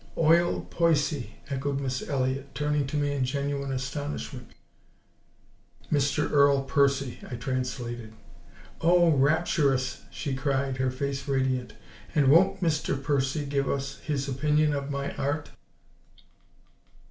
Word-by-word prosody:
"Oil 170 +2 +3
Poicy," 150 -8 +1 0.2
echoed 140 +1 -1
Miss 130 -2 -3
Elliott, 135 0 -1
turning 150 -1 0
to 150 - -2
me 145 -1 +1
in 140 -2 0
genuine 140 +1 -2
astonishment. 135 -1 -4 1.4
"Mr. 145 0 +1
Earl 140 -1 +4
Percy," 140 -2 +1
I 125 - -4
translated. 125 -2 -4 0.7
"Oh, 175 0 +5
RAPTUROUS!" 140 -2 +2
she 140 - -4
cried, 135 0 -1
her 130 0 +1
face 140 +2 -3
radiant. 130 -3 0 0.4
"And 140 -3 +5
WON'T 190 +4 +4
Mr. 150 -4 +1
Percy 140 +1 0
give 140 -1 -1
us 135 -1 -3
his 140 -2 -2
opinion 150 +3 +2
of 140 0 -3
my 140 0 -3
Art?" 145 +2 -2
140 Hz, 120 wpm, -27 LUFS, 130-150 Hz, 1.4 s, Oh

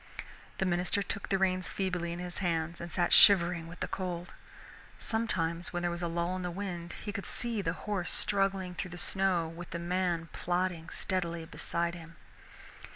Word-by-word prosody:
The 190 - +1
minister 180 +2 +1
took 200 - -4
the 195 - +3
reins 185 -1 +1
feebly 180 -3 -1
in 170 - -4
his 180 0 -4
hands 170 -2 -1
and 170 0 -6
sat 175 -2 +2
shivering 175 -4 +7
with 170 +2 -10
the - - 0
cold. 175 -2 -4 0.6
Sometimes 175 -7 0
when 175 0 -2
there 175 - +1
was 170 0 -4
a 170 - 0
lull 170 +2 -1
in 185 - -3
the 180 - -2
wind, 175 -2 -4
he 205 - -3
could 200 -2 -5
see 235 -3 -1
the 165 -3 0
horse 200 -4 0
struggling 195 -2 +1
through 185 +1 -4
the 175 - -8
snow 185 -2 +2
with 170 +1 -8
the 170 - -3
man 170 -1 0
plodding 175 -2 -1
steadily 170 -3 -2
beside 170 +1 -2
him. 165 -1 -10
175 Hz, 185 wpm, -32 LUFS, 170-190 Hz, 0.6 s, shivering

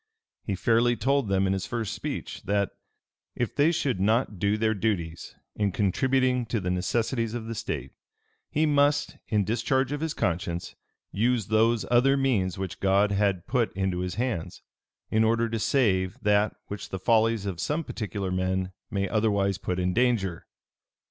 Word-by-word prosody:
He 100 - -3
fairly 120 +4 +3
told 135 +2 +1
them 95 0 +2
in 95 - +1
his 95 -2 -3
first 115 -3 -3
speech, - - -5
that, 100 0 +1 0.6
"If 120 -3 -2
they 150 +3 +4
should 135 - -1
not 110 0 +1
do 100 +2 +1
their 110 0 +2
duties 90 -6 -2 0.2
in 105 -2 0
contributing 125 +5 +1
to 115 - -1
the 90 -2 -2
necessities 115 +5 -1
of 115 -2 -4
the 115 - -4
state, 70 - -4 0.6
he 155 +2 +1
must, 145 -1 +2
in 105 -2 +2
discharge 130 +5 0
of 145 0 -3
his 160 -1 -2
conscience, 85 -1 -2 0.4
use 115 +2 +1
those 110 +1 +3
other 135 +3 +4
means 105 -9 +1
which 95 -2 -5
God 100 +1 +3
had 100 -3 +1
put 120 -4 +1
into 95 -2 0
his 90 0 -3
hands, 115 -8 -3 0.5
in 110 +1 +3
order 115 +1 +2
to 115 0 -3
save 100 -6 +1
that 105 0 +3
which 105 - -7
the 95 - -4
follies 110 +1 +2
of 95 -4 -4
some 150 - -1
particular 100 -7 -4
men 95 0 -1 0.2
may 100 -2 -1
otherwise 100 -3 +1
put 90 -2 -2
in 90 0 0
danger. 110 -7 0
105 Hz, 170 wpm, -27 LUFS, 95-120 Hz, 0.6 s, they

